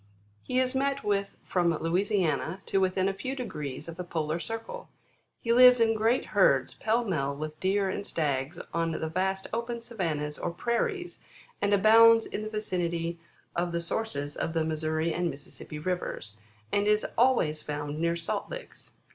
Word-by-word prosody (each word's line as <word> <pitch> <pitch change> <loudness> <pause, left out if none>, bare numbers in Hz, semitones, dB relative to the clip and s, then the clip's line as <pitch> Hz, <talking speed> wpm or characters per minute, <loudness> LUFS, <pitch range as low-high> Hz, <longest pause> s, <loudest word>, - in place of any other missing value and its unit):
He 250 - 0
is 255 0 +2
met 275 +1 0
with 200 -1 -1
from 170 -3 +1
Louisiana 185 0 0
to 195 - +1
within 185 0 +2
a 195 - 0
few 255 +8 -4
degrees 150 - -5
of 170 0 -8
the 180 - -3
polar 160 -2 -2
circle. 225 - -6 0.5
He 230 - +2
lives 250 0 +8
in 225 -1 +4
great 225 +3 +2
herds, 140 -10 +4
pell 230 +2 0
mell 140 -8 -1
with 155 +1 -6
deer 195 +1 +1
and 190 - -3
stags 145 -3 -2 0.2
on 165 0 0
the 160 - -2
vast 190 +3 -1
open 235 0 -3
savannas 155 -10 -2
or - - -1
prairies, 350 - -2 0.4
and 205 - +2
abounds 225 +3 +7
in - - -4
the 215 - -4
vicinity 170 -5 -2 0.4
of 175 0 0
the 170 - -1
sources 170 -5 -3
of 165 - -2
the 165 -1 +1
Missouri 160 +1 -1
and 175 0 0
Missis 140 -2 -8
sippi 150 - -7
rivers, 180 - -3 0.4
and 205 0 +2
is 210 0 +3
always 225 -12 +3
found 145 0 -4
near 170 +1 +1
salt 170 -1 -3
licks. - - -9
185 Hz, 170 wpm, -28 LUFS, 160-225 Hz, 0.5 s, lives